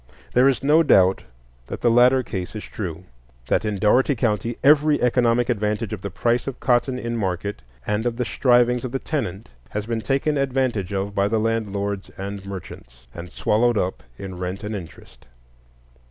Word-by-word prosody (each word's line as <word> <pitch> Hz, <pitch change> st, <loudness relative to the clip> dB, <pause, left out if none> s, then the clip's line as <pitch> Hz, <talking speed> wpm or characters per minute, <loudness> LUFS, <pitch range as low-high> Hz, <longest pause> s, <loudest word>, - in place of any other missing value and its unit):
There 125 Hz, +2 st, +5 dB
is 135 Hz, -1 st, -1 dB
no 150 Hz, +4 st, +5 dB
doubt 95 Hz, -, +4 dB, 0.4 s
that -, -, -6 dB
the 120 Hz, -, +3 dB
latter 125 Hz, +2 st, +5 dB
case 95 Hz, -3 st, -5 dB
is 105 Hz, -, -5 dB
true; 90 Hz, -4 st, -6 dB, 0.5 s
that -, -, +2 dB
in 105 Hz, -2 st, -2 dB
Dougherty 125 Hz, +8 st, +3 dB
County 115 Hz, -1 st, -1 dB
every 150 Hz, +1 st, +5 dB
economic 120 Hz, -1 st, +2 dB
advantage 105 Hz, -1 st, -1 dB
of 105 Hz, -, -5 dB
the 100 Hz, -, -4 dB
price 120 Hz, +7 st, 0 dB
of 135 Hz, -, -5 dB
cotton 125 Hz, +1 st, +1 dB
in 120 Hz, -1 st, -3 dB
market 100 Hz, -1 st, -3 dB, 0.2 s
and 105 Hz, +3 st, -1 dB
of 115 Hz, -1 st, -3 dB
the 125 Hz, -, -1 dB
strivings 125 Hz, 0 st, +3 dB
of 130 Hz, -1 st, -5 dB
the -, -, +1 dB
tenant 110 Hz, -, -4 dB, 0.2 s
has 105 Hz, 0 st, -4 dB
been 115 Hz, 0 st, -2 dB
taken 140 Hz, +4 st, 0 dB
advantage 130 Hz, -8 st, -1 dB
of 100 Hz, +1 st, -2 dB
by 100 Hz, 0 st, +1 dB
the 110 Hz, +1 st, 0 dB
landlords 100 Hz, -3 st, -2 dB
and 100 Hz, 0 st, -6 dB
merchants, 65 Hz, -10 st, -10 dB
and 85 Hz, 0 st, -9 dB
swallowed 115 Hz, +2 st, +1 dB
up 90 Hz, -1 st, -1 dB, 0.2 s
in 95 Hz, -2 st, -7 dB
rent 90 Hz, +3 st, -4 dB
and 105 Hz, +1 st, -4 dB
interest. 85 Hz, -8 st, -11 dB
110 Hz, 180 wpm, -22 LUFS, 100-125 Hz, 0.5 s, There